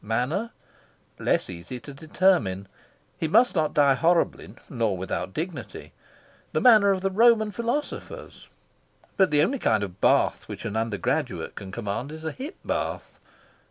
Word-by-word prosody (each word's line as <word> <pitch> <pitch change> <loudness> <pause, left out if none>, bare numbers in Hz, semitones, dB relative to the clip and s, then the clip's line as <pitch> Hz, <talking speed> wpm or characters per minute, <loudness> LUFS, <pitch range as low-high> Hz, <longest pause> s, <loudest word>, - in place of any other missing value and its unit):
Manner:.. 125 - -1 0.7
less - - +1
easy 90 +7 -8
to 145 - -10
determine. 140 - +1 0.5
He 160 - 0
must 230 +9 +4
not 155 -4 0
die 140 -2 +5
horribly, 170 +4 +1
nor 115 - -1
without 95 +1 -4
dignity. 165 - -6 0.6
The - - +2
manner 215 -5 +6
of 190 -1 +1
the 195 0 0
Roman 220 +1 +4
philosophers? 235 +7 -5 0.7
But 190 -2 +4
the 150 0 +4
only 260 - 0
kind 110 - +1
of 95 -1 -8
bath - - +2
which - - -7
an 105 - -4
undergraduate 110 -2 -2
can 95 -1 -9
command 115 +6 -4
is 160 0 -9
a 160 - -3
hip 285 +8 -7
bath. - - -4
155 Hz, 150 wpm, -25 LUFS, -, 0.7 s, manner